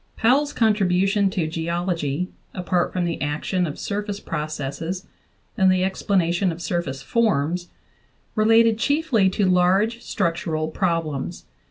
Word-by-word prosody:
Powell's 280 Hz, +6 st, +3 dB
contribution 200 Hz, -3 st, +2 dB
to 185 Hz, -3 st, -1 dB
geology 170 Hz, 0 st, -2 dB, 0.3 s
apart 180 Hz, -1 st, 0 dB
from 180 Hz, -1 st, -1 dB
the 170 Hz, -1 st, -3 dB
action 155 Hz, +5 st, -1 dB
of 150 Hz, -, -6 dB
surface 205 Hz, 0 st, -3 dB
processes 155 Hz, +3 st, -4 dB, 0.5 s
and 190 Hz, -4 st, +4 dB
the 185 Hz, 0 st, +2 dB
explanation 185 Hz, -1 st, +1 dB
of 165 Hz, -, -7 dB
surface 155 Hz, -7 st, -3 dB
forms 175 Hz, -, 0 dB, 0.6 s
re 215 Hz, -1 st, +1 dB
lated 225 Hz, 0 st, +5 dB
chiefly 285 Hz, -9 st, +2 dB
to 195 Hz, +2 st, 0 dB
large 190 Hz, +6 st, +2 dB
structural 165 Hz, -6 st, -1 dB
problems. 165 Hz, -5 st, -2 dB
180 Hz, 125 wpm, -23 LUFS, 165-205 Hz, 0.6 s, lated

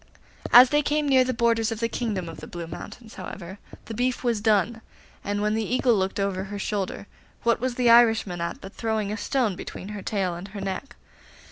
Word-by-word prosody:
As 250 Hz, +1 st, +9 dB
they 295 Hz, 0 st, +4 dB
came 300 Hz, 0 st, 0 dB
near 265 Hz, -2 st, +5 dB
the 255 Hz, -, -1 dB
borders 230 Hz, -1 st, +1 dB
of 225 Hz, -, -4 dB
the 230 Hz, -, +1 dB
kingdom 215 Hz, -6 st, -3 dB
of 165 Hz, -, -8 dB
the -, -, -9 dB
Blue 170 Hz, -1 st, -6 dB
Mountains, 220 Hz, +7 st, -9 dB
however, 185 Hz, 0 st, -8 dB, 0.3 s
the 225 Hz, -, -7 dB
beef 250 Hz, +3 st, -1 dB
was 235 Hz, -4 st, 0 dB
done, 220 Hz, +1 st, +2 dB, 0.4 s
and, 205 Hz, +1 st, -2 dB
when 210 Hz, 0 st, +1 dB
the 220 Hz, 0 st, 0 dB
Eagle 245 Hz, +2 st, +2 dB
looked 195 Hz, -1 st, 0 dB
over 195 Hz, -1 st, -1 dB
her 205 Hz, +1 st, -6 dB
shoulder, 200 Hz, -1 st, -3 dB, 0.4 s
what 235 Hz, -1 st, +2 dB
was 250 Hz, 0 st, -2 dB
the 245 Hz, -2 st, +4 dB
Irishman 225 Hz, -7 st, +4 dB
at 170 Hz, -, -3 dB
but 195 Hz, +2 st, -10 dB
throwing 220 Hz, -3 st, -2 dB
the 210 Hz, -, -3 dB
stone 235 Hz, -6 st, 0 dB
between 190 Hz, +2 st, -8 dB
her 210 Hz, -1 st, -6 dB
tail 190 Hz, -2 st, -1 dB
and 175 Hz, +3 st, -7 dB
her 200 Hz, +1 st, -8 dB
neck! 195 Hz, +7 st, -5 dB
215 Hz, 215 wpm, -25 LUFS, 195-240 Hz, 0.4 s, As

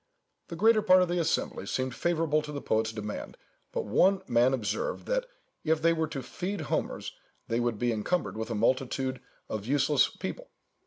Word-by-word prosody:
The 170 Hz, -, -6 dB
greater 220 Hz, +4 st, +5 dB
part 185 Hz, -2 st, +6 dB
of 180 Hz, -, -2 dB
the 175 Hz, 0 st, +1 dB
assembly 160 Hz, -, -1 dB
seemed 130 Hz, +2 st, -1 dB
favourable 160 Hz, 0 st, +1 dB
to 150 Hz, 0 st, -7 dB
the 145 Hz, -, -4 dB
poet's 110 Hz, -3 st, 0 dB
demand, 105 Hz, -1 st, -6 dB, 0.3 s
but -, -, -2 dB
one 185 Hz, -, +3 dB
man 120 Hz, +1 st, +4 dB
observed 135 Hz, -, -2 dB
that -, -, 0 dB, 0.4 s
"if 160 Hz, -1 st, +2 dB
they 165 Hz, +1 st, +4 dB
were 160 Hz, -1 st, 0 dB
to 135 Hz, -3 st, -5 dB
feed 195 Hz, +3 st, -4 dB
Homers, -, -, -2 dB, 0.3 s
they 115 Hz, -, 0 dB
would 120 Hz, -2 st, 0 dB
be 120 Hz, +2 st, +1 dB
encumbered 155 Hz, +11 st, -1 dB
with 110 Hz, +1 st, -4 dB
a 115 Hz, -, -2 dB
multitude 130 Hz, +3 st, 0 dB, 0.3 s
of 110 Hz, 0 st, -4 dB
useless 140 Hz, +1 st, +3 dB
people." -, -, -6 dB
140 Hz, 180 wpm, -29 LUFS, 120-175 Hz, 0.4 s, part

